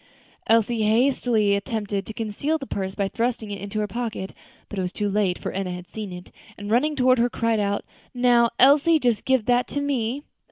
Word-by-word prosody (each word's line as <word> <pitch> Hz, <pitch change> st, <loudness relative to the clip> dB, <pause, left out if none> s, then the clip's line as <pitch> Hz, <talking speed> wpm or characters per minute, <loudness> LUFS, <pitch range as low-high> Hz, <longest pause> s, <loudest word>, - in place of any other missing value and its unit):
Elsie 225 Hz, 0 st, +3 dB
hastily 220 Hz, -2 st, +2 dB
attempted 205 Hz, -2 st, -3 dB
to -, -, -5 dB
conceal 230 Hz, +8 st, -2 dB
the 275 Hz, -, -7 dB
purse 190 Hz, -5 st, -4 dB
by 200 Hz, -2 st, 0 dB
thrusting 230 Hz, 0 st, -2 dB
it 200 Hz, -2 st, -6 dB
into 200 Hz, +1 st, -4 dB
her 210 Hz, -, 0 dB
pocket, 225 Hz, -5 st, -4 dB, 0.3 s
but 205 Hz, -, -5 dB
it -, -, +1 dB
was 180 Hz, -1 st, -2 dB
too 205 Hz, -, -2 dB
late, 200 Hz, -3 st, +1 dB
for -, -, -5 dB
Enna 195 Hz, -1 st, -3 dB
had 180 Hz, 0 st, -6 dB
seen 215 Hz, -3 st, -7 dB
it, 180 Hz, 0 st, -10 dB, 0.3 s
and 205 Hz, +1 st, -6 dB
running 295 Hz, +6 st, +2 dB
toward 255 Hz, -2 st, +3 dB
her, 240 Hz, +1 st, +3 dB
cried 230 Hz, -2 st, 0 dB
out, 205 Hz, 0 st, -1 dB, 0.3 s
"Now, 245 Hz, -1 st, +3 dB
Elsie, 295 Hz, +5 st, +5 dB
just 240 Hz, -7 st, 0 dB
give 260 Hz, -5 st, +2 dB
that 245 Hz, +1 st, +2 dB
to 285 Hz, -, -3 dB
me!" 275 Hz, -1 st, -1 dB
225 Hz, 205 wpm, -24 LUFS, 205-250 Hz, 0.3 s, Elsie